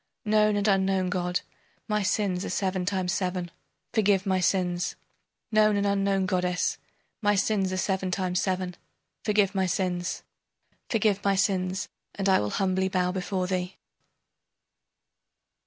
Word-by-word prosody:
Known 215 Hz, 0 st, +3 dB
and 205 Hz, +1 st, +1 dB
unknown 190 Hz, -2 st, +2 dB
god, 180 Hz, 0 st, -1 dB, 0.5 s
my 210 Hz, -1 st, +1 dB
sins 195 Hz, -2 st, 0 dB
are -, -, -4 dB
seven 185 Hz, -2 st, -1 dB
times 185 Hz, -3 st, 0 dB
seven 180 Hz, -1 st, -2 dB, 0.4 s
forgive 205 Hz, -3 st, +3 dB
my 190 Hz, -1 st, +2 dB
sins! 180 Hz, -1 st, 0 dB, 0.6 s
Known 215 Hz, -1 st, +4 dB
and 200 Hz, -, +1 dB
unknown 195 Hz, -1 st, +1 dB
goddess, 180 Hz, -2 st, 0 dB, 0.4 s
my 205 Hz, -1 st, +3 dB
sins 195 Hz, -1 st, +1 dB
are 185 Hz, -, -2 dB
seven 190 Hz, 0 st, 0 dB
times 180 Hz, -1 st, 0 dB
seven 185 Hz, -2 st, -1 dB, 0.5 s
forgive 205 Hz, -2 st, +2 dB
my 190 Hz, -2 st, +1 dB
sins! 180 Hz, -1 st, -2 dB, 0.7 s
Forgive 210 Hz, -3 st, +1 dB
my 200 Hz, -1 st, +3 dB
sins, 190 Hz, -1 st, 0 dB, 0.3 s
and 195 Hz, -1 st, -1 dB
I 190 Hz, -, +5 dB
will 105 Hz, -, -1 dB
humbly 190 Hz, -, 0 dB
bow 180 Hz, -1 st, +1 dB
before 185 Hz, 0 st, -2 dB
thee. 180 Hz, 0 st, -3 dB
190 Hz, 140 wpm, -27 LUFS, 180-200 Hz, 0.7 s, I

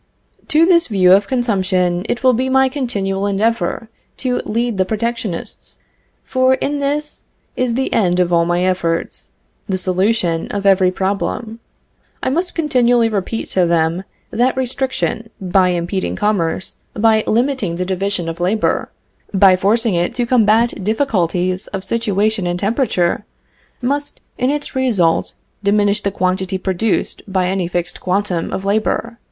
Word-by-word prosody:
To 315 Hz, +2 st, +4 dB
this 340 Hz, -2 st, +4 dB
view 185 Hz, -4 st, +4 dB
of 200 Hz, +1 st, +4 dB
consumption, 190 Hz, -6 st, 0 dB
it 240 Hz, -, -2 dB
will 255 Hz, -1 st, +5 dB
be 255 Hz, +3 st, 0 dB
my 265 Hz, 0 st, +4 dB
continual 200 Hz, -8 st, -2 dB
endeavor 225 Hz, +3 st, 0 dB, 0.3 s
to 250 Hz, -2 st, -1 dB
lead 230 Hz, -2 st, -1 dB
the -, -, +5 dB
protectionists; 220 Hz, -2 st, -4 dB, 0.5 s
for 260 Hz, 0 st, +2 dB
in 285 Hz, +2 st, -2 dB
this 295 Hz, +2 st, -3 dB, 0.3 s
is 250 Hz, -2 st, 0 dB
the 265 Hz, +1 st, -1 dB
end 180 Hz, -4 st, +2 dB
of 175 Hz, -1 st, +1 dB
all 170 Hz, 0 st, +4 dB
my 175 Hz, +1 st, 0 dB
efforts, 170 Hz, -3 st, -1 dB, 0.4 s
the 190 Hz, -, 0 dB
solution 185 Hz, -2 st, +1 dB
of 200 Hz, -1 st, -4 dB
every 190 Hz, -2 st, +5 dB
problem. 200 Hz, +4 st, -3 dB, 0.6 s
I -, -, 0 dB
must 345 Hz, +5 st, -1 dB
continually 245 Hz, -7 st, +2 dB
repeat 215 Hz, +1 st, -3 dB
to 180 Hz, -2 st, +2 dB
them 170 Hz, +2 st, +1 dB, 0.3 s
that 250 Hz, +3 st, +1 dB
restriction, 255 Hz, -3 st, -2 dB
by 185 Hz, -1 st, +2 dB
impeding 175 Hz, +2 st, -2 dB
commerce, 190 Hz, -4 st, -1 dB, 0.2 s
by 220 Hz, 0 st, +3 dB
limiting 235 Hz, -6 st, 0 dB
the 180 Hz, +1 st, -2 dB
division 190 Hz, -1 st, -2 dB
of 165 Hz, +1 st, -5 dB
labor, 195 Hz, +5 st, 0 dB, 0.5 s
by 190 Hz, -1 st, +6 dB
forcing 215 Hz, +4 st, +1 dB
it 175 Hz, 0 st, 0 dB
to 245 Hz, -, 0 dB
combat 230 Hz, -3 st, +2 dB
difficulties 185 Hz, -, 0 dB
of 195 Hz, -2 st, -5 dB
situation 210 Hz, -2 st, 0 dB
and 175 Hz, 0 st, -1 dB
temperature, 205 Hz, -4 st, 0 dB, 0.6 s
must 285 Hz, +3 st, -2 dB, 0.2 s
in 250 Hz, +1 st, +2 dB
its 295 Hz, 0 st, -3 dB
results 215 Hz, -11 st, +1 dB, 0.3 s
diminish 205 Hz, +1 st, +2 dB
the 200 Hz, -, 0 dB
quantity 190 Hz, 0 st, -1 dB
produced 190 Hz, +3 st, -1 dB
by 185 Hz, -1 st, +1 dB
any 185 Hz, -1 st, -1 dB
fixed 175 Hz, 0 st, -3 dB
quantum 185 Hz, -2 st, -1 dB
of 195 Hz, -, -4 dB
labor. 220 Hz, +3 st, -1 dB
205 Hz, 145 wpm, -18 LUFS, 185-240 Hz, 0.6 s, by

